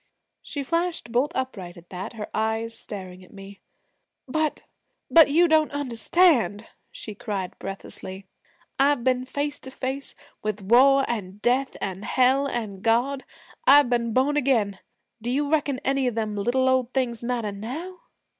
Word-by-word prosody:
She 285 -2 -5
flashed 335 -3 -2
bolt 255 +6 +1
upright 195 -9 -4
at 170 0 -16
that, 185 +4 -6
her 215 -2 -6
eyes 220 +1 -1
staring 185 -4 -8
at - - -18
me. 195 0 -12 0.7
'But 310 +3 -1 0.5
but 325 -2 +8
you 340 +5 +5
don't 315 -1 +3
understand,' 270 - +2 0.3
she 215 - -8
cried 200 -3 -4
breathlessly. 195 0 -7 0.5
'I've 280 -2 +3
been 255 0 +1
face 285 +2 -3
to 265 - -9
face 265 +1 -5 0.3
with 210 -1 -3
war 270 +6 +5
an' 200 -5 -4
death 260 +2 +1
an' 190 0 -4
Hell 260 +5 +2
an' 215 -7 -4
God, 245 +5 +1 0.4
I've 285 - +7
been 235 -1 +1
born 270 +5 +2
again, 225 -9 +1 0.4
do 235 - -3
you 285 +3 +1
reckon 290 -4 +1
any 270 -1 +1
of 245 - -1
them 215 -2 -2
little 245 +6 +1
old 255 -1 +1
things 240 -3 -1
matter 235 -3 -2
now?' 290 - -6
245 Hz, 155 wpm, -25 LUFS, 210-275 Hz, 0.7 s, but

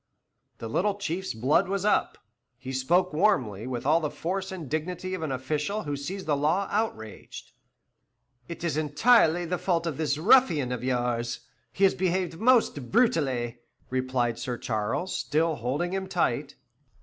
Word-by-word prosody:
The 115 - -6
little 195 - 0
Chief's 190 - -3
blood 135 - +2
was 195 +1 -2
up; 210 - +1 0.4
he 130 +1 -7
spoke 175 +7 +2
warmly, 130 - +1
with 125 -1 -4
all 155 +4 +4
the 155 -2 -2
force 190 +5 -3
and 175 -6 -6
dignity 180 +5 -3
of 185 - -3
an 155 -3 -2
official 150 +10 -2
who 145 -1 -3
sees 185 +8 -5
the 150 - +1
law 160 +8 +1
outraged. 110 - -4 1.0
"It 170 - -8
is 160 -4 -1
entirely 165 - +4
the 180 +1 -2
fault 170 -3 0
of 160 -5 -3
this 155 -2 0
ruffian 165 - +4
of 125 -1 -4
yours; 120 -2 -1 0.3
he 195 - -2
has 195 - +6
behaved 180 -2 -1
most 225 - +3
brutally," 135 - +1 0.3
replied 130 -2 -1
Sir 125 -2 -3
Charles, 115 - -2
still 160 0 0
holding 140 +10 -2
him 190 0 -2
tight. - - -1
155 Hz, 160 wpm, -27 LUFS, 130-185 Hz, 1.0 s, has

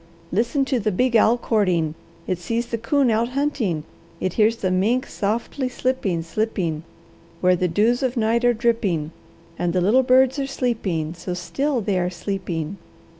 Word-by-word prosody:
Listen 240 - +1
to 265 -2 0
the 215 0 0
big 245 +5 +1
owl 225 +2 +5
courting; 185 -10 +1 0.3
it 185 -2 -2
sees 230 +7 -2
the 235 -1 -4
coon 260 +2 +2
out 225 +2 +1
hunting, 240 - 0 0.4
it 185 - -1
hears 220 +1 +3
the 190 -5 -1
mink 225 +8 +1
softly 235 +5 -2
slipping, 245 -10 -1
slipping, 170 -4 -2 0.6
where 180 0 +4
the 180 +1 0
dews 220 +8 +2
of 255 -1 -1
night 230 +1 +2
are 245 - +5
dripping. 220 -10 0 0.5
And 175 -1 0
the 180 - +2
little 215 +9 +4
birds 260 +1 +4
are 270 - -1
sleeping, 205 - -2
so 180 +1 -5
still 265 +9 -1
they 195 -2 0
are 180 0 0
sleeping. 180 -2 -4
220 Hz, 170 wpm, -22 LUFS, 180-245 Hz, 0.6 s, owl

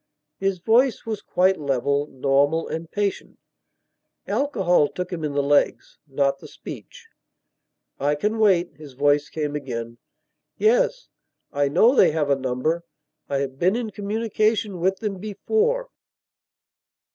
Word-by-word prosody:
His 195 -1 0
voice 235 +8 +2
was 220 -2 -4
quite 185 0 +2
level, 140 +1 0
normal, 140 +4 +1
and 160 0 -5
patient. 205 0 -3 0.9
Alcohol 200 - +2
took 180 +4 -5
him 165 -3 -4
in 150 -2 -2
the 140 0 +1
legs, 145 +1 +1
not 140 0 0
the - - -11
speech. 485 -2 -11 0.9
"I 145 +2 +1
can 210 +9 -1
wait," 185 -6 +3
his 150 -3 -12
voice 145 +2 +2
came 150 -2 -3
again. 120 -4 -5 0.6
"Yes, - - +2 0.4
I 145 -1 +2
know 185 - +4
they - - +6
have 150 -3 0
a - - +5
number. 135 +6 -1 0.5
I 140 -1 0
have 135 -1 -5
been 185 +4 +3
in 235 -3 -3
communication 215 -1 -1
with 190 +3 +1
them 205 -4 -3
before." 440 - -1
170 Hz, 135 wpm, -23 LUFS, 145-215 Hz, 0.9 s, they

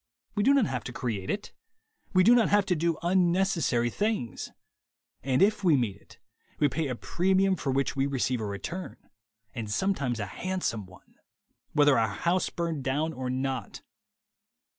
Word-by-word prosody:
We 205 - 0
do 275 +7 +5
not 270 -6 +4
have 125 - -3
to - - -5
create 110 -7 -4
it. - - -3 0.6
We 185 - +4
do 230 +5 +7
not 240 -2 +4
have 205 -1 +4
to 180 - +1
do 165 0 0
unnecessary 175 -9 +2
things. 205 - -2 0.7
And 130 +7 +2
if 205 0 +2
we 165 -6 +5
meet 115 -6 -1
it, 100 - -19 0.4
we 145 - +4
pay 150 +3 -2
a 125 - -3
premium 190 +7 +1
for 140 -5 -2
which 135 +1 0
we 135 0 +1
receive 130 -3 -1
a - - -2
return, 100 - -6 0.6
and 115 -4 -5
sometimes 135 - 0
a 105 - -2
hand 185 - -4
some 105 -4 -2
one, 90 0 -19 0.6
whether 145 -2 +5
our 110 - +2
house 170 - 0
burn 170 -4 -3
down 145 +5 -1
or 130 -2 -4
not. 130 0 -3
145 Hz, 175 wpm, -28 LUFS, 125-185 Hz, 0.7 s, do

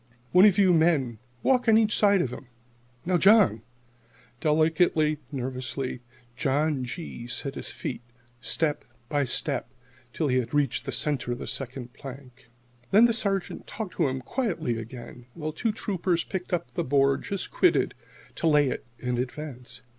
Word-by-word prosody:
"One 180 +3 +7
of 200 -4 +5
you 190 -3 +5
men 155 -9 +2 0.2
walk 250 -2 +3
on 220 - +7
each 220 -2 +3
side 200 -3 +4
of 125 - -3
him. 135 - -9 0.6
Now, 180 0 +2
John!" 195 - +5 0.8
Delicately, 155 0 +2
nervously, 130 -1 -4 0.4
John 145 +1 0
G. 120 -2 -6
set 135 +3 -3
his - - -6
feet, 125 - -5 0.4
step 150 +4 0 0.3
by 145 -1 +1
step, 140 +2 +1 0.4
till 155 - -1
he 130 -1 +2
had 120 +3 -4
reached 140 -2 +1
the - - -1
centre 140 -5 0
of - - -5
the - - -6
second 125 -2 -6
plank. 135 -3 -11 0.4
Then 215 +4 +7
the 235 - +3
Sergeant 200 -4 -2
talked 215 -4 -6
to 165 - +3
him 130 0 -3
quietly 165 - -2
again, 120 +1 -10
while 155 -2 -4
two 220 +9 -1
Troopers 185 -5 -1
picked 185 -1 -5
up 165 -9 -2
the - - -2
board 140 0 +2
just 200 -1 -4
quitted 365 - +3 0.4
to 165 - 0
lay 150 -3 +4
it - - -4
in 125 -1 -2
advance. 130 -1 -5
145 Hz, 160 wpm, -27 LUFS, 130-180 Hz, 0.8 s, One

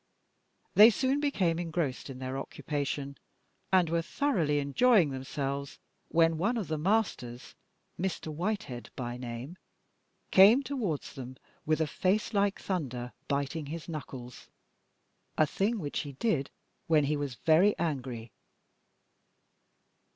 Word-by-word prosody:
They 215 +2 +10
soon 260 +5 +1
became 195 - +1
engrossed 160 -6 -2
in 130 - -7
their 130 0 -4
occupation, 140 0 -4 0.5
and 185 -3 +5
were 165 +1 +1
thoroughly 170 - 0
enjoying 160 - +4
themselves, 140 +1 -4 0.3
when 165 -1 +3
one 225 +7 +1
of 205 -8 -3
the 155 - -1
masters, 155 - -1 0.5
Mr. 175 -4 -3
Whitehead 175 - -3
by 120 -1 -4
name, 125 +7 -7 0.7
came 215 +8 +7
towards 225 - -3
them 130 -1 -8 0.3
with 155 0 +2
a - - +3
face 195 +8 0
like 200 -1 +2
thunder, 130 -10 -3
biting 145 +2 -2
his 160 +2 -6
knuckles, 130 -6 -8 0.9
a 155 - +5
thing 205 +9 0
which 150 -8 -3
he 145 -3 -5
did 140 - 0 0.4
when 155 -2 +4
he 145 +2 +1
was 145 -3 -3
very 165 - +4
angry. 125 -8 -3
155 Hz, 125 wpm, -30 LUFS, 135-190 Hz, 0.9 s, They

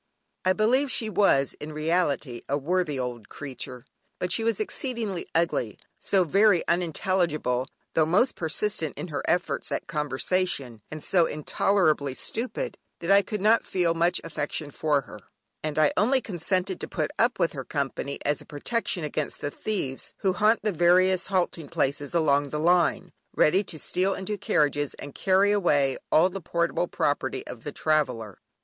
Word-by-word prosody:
I 185 - +3
believe 250 +7 +2
she 220 -3 -1
was 140 -11 +3
in 150 +1 -7
reality 155 -6 0
a 140 - +1
worthy 160 0 0
old 125 -4 -5
creature, 130 -2 -7 0.3
but 180 - -1
she 225 - +2
was 230 0 +1
so - - +1
exceedingly 235 - -2
ugly, 165 - 0 0.2
so 195 -2 +2
very 195 +2 +3
unintelligible 165 -7 0 0.3
(though 155 -1 +3
most 205 +11 +3
persistent 165 0 -1
in 180 - -5
her 145 - -3
efforts 175 0 0
at - - -2
conversation) 150 -4 -1
and 155 -1 -7
so 175 -3 +3
intolerably 155 -2 +1
stupid, 255 - -4 0.2
that 170 +3 -1
I 200 0 +7
could 210 -1 -5
not 220 +3 +4
feel 175 -3 +1
much 170 +1 +2
affection 150 -2 -3
for 150 -1 +1
her, 105 - -12 0.4
and 155 -1 -4
I 155 -1 +4
only 250 +7 +3
consented 185 -2 -2
to - - -4
put 155 -4 -2
up 240 +2 +3
with 165 - +1
her 135 -3 -5
company 140 0 -3
as 145 -1 +1
a - - -13
protection 180 +3 -2
against 150 0 -3
the 145 - -3
thieves 140 -12 -4
who 190 -2 +2
haunt 215 +3 +3
the 215 - +1
various 180 +2 +3
halting 175 -5 -1
places 140 +4 -1
along 145 -3 +3
the 150 - -3
line, 170 -2 +2 0.2
ready 185 +6 +4
to 165 - -6
steal 185 +5 0
into 195 +2 -3
carriages 145 -6 0
and 145 - -9
carry 195 +1 +3
away 145 -10 +2 0.2
all 160 +3 +6
the 190 +1 -6
portable 170 +1 0
property 135 -4 -1
of 115 - -9
the 145 - -5
traveller. 130 -11 -1
165 Hz, 170 wpm, -26 LUFS, 145-190 Hz, 0.4 s, I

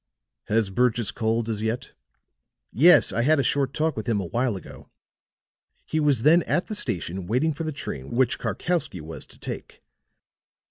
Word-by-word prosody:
Has 110 -2 +1
Burgess 120 -1 +1
called 115 0 -1
as 110 -2 -3
yet?" 115 +4 -3 0.8
"Yes, 165 - +6
I 115 - +1
had 150 +4 +3
a - - +2
short 135 -1 +1
talk 155 +2 -1
with 110 +2 -4
him 110 -3 +1
a 95 - -3
while 120 +5 -1
ago. 95 - -11 1.0
He 155 - -1
was 145 -6 +2
then 165 +4 +6
at 175 - +1
the - - -6
station 95 - -1
waiting 135 - +1
for 165 - -5
the 155 - -2
train 70 - -6
which 130 +1 +1
Karkowsky 170 - -2
was 80 +1 -8
to - - -18
take. - - -8
120 Hz, 175 wpm, -25 LUFS, 110-150 Hz, 1.0 s, Yes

